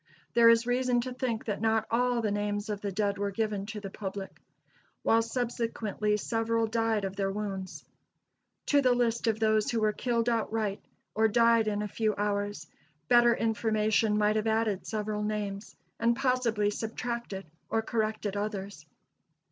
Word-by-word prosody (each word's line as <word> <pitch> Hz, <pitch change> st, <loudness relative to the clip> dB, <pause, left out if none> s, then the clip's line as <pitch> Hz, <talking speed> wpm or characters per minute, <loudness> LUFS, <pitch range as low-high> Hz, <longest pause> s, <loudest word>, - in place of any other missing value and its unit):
There 235 Hz, -1 st, +7 dB
is 230 Hz, 0 st, +5 dB
reason 245 Hz, 0 st, +1 dB
to 255 Hz, +1 st, -5 dB
think 245 Hz, -3 st, -2 dB
that 210 Hz, -2 st, -3 dB
not 220 Hz, 0 st, +2 dB
all 245 Hz, 0 st, +1 dB
the 210 Hz, -, +1 dB
names 205 Hz, +1 st, -2 dB
of 205 Hz, -1 st, -4 dB
the 200 Hz, -, -3 dB
dead 200 Hz, 0 st, -1 dB
were 200 Hz, 0 st, 0 dB
given 205 Hz, -1 st, -2 dB
to 215 Hz, -1 st, -5 dB
the 195 Hz, -2 st, -7 dB
public, 195 Hz, -1 st, -6 dB, 0.6 s
while 225 Hz, -, +4 dB
subsequently 230 Hz, -3 st, -1 dB
several 225 Hz, +1 st, 0 dB
died 225 Hz, -2 st, 0 dB
of 190 Hz, 0 st, -4 dB
their 195 Hz, -1 st, 0 dB
wounds. 190 Hz, -5 st, -5 dB, 0.8 s
To 285 Hz, -1 st, +4 dB
the 255 Hz, -2 st, +3 dB
list 235 Hz, -1 st, 0 dB
of 220 Hz, -1 st, +1 dB
those 215 Hz, -1 st, +2 dB
who 230 Hz, -, 0 dB
were 215 Hz, -1 st, +2 dB
killed 235 Hz, 0 st, -1 dB
outright, 220 Hz, -3 st, -1 dB, 0.3 s
or 220 Hz, 0 st, +3 dB
died 230 Hz, 0 st, +4 dB
in 210 Hz, 0 st, 0 dB
a -, -, -2 dB
few 215 Hz, 0 st, -1 dB
hours, 205 Hz, -4 st, -2 dB, 0.4 s
better 240 Hz, -1 st, +6 dB
information 220 Hz, -1 st, +1 dB
might 210 Hz, 0 st, +2 dB
have 215 Hz, +1 st, 0 dB
added 220 Hz, -3 st, 0 dB
several 210 Hz, -1 st, -2 dB
names, 210 Hz, -1 st, -3 dB, 0.2 s
and 235 Hz, +1 st, +3 dB
possibly 240 Hz, -5 st, +1 dB
subtracted 225 Hz, -2 st, -4 dB, 0.2 s
or 225 Hz, -, 0 dB
corrected 215 Hz, -3 st, -2 dB
others. 200 Hz, -6 st, -4 dB
220 Hz, 165 wpm, -29 LUFS, 205-230 Hz, 0.8 s, There